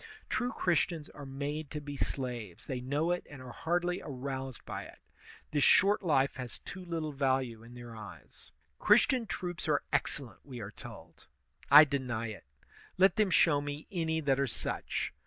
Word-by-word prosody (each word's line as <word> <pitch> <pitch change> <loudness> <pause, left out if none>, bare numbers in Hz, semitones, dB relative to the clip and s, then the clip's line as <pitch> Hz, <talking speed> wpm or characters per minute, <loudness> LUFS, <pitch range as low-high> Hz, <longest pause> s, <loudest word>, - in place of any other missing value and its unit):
True 250 0 0
Christians 170 -5 0
are 145 -2 -10
made 145 +2 -4
to 150 - -4
be 145 -1 -7
slaves; 125 -9 -3
they 130 -2 -3
know 145 +6 0
it 175 - -1
and 145 - -10
are 130 -1 -9
hardly 175 +5 -1
aroused 130 -3 -5
by - - -5
it. - - -13 0.5
This 145 -2 +2
short 200 +2 +5
life 140 -8 +2
has 125 -2 -6
too 185 - -9
little 165 -3 -3
value 130 -4 0
in 115 +2 -13
their 120 -1 -9
eyes. 105 -2 -12 0.3
Christian 235 +2 +4
troops 175 -4 -4
are 145 -2 +2
excellent, 140 -3 -2
we 130 -4 -8
are 105 -2 -6
told. - - -12 0.4
I 150 +2 +11
deny 125 -6 -2
it; 110 - -9 0.5
let 190 +1 +5
them 215 -2 +3
show 165 -4 +4
me 145 +1 -5
any 160 -3 0
that 135 -3 +2
are 140 - +2
such. 115 - -3
145 Hz, 175 wpm, -32 LUFS, 130-165 Hz, 0.5 s, I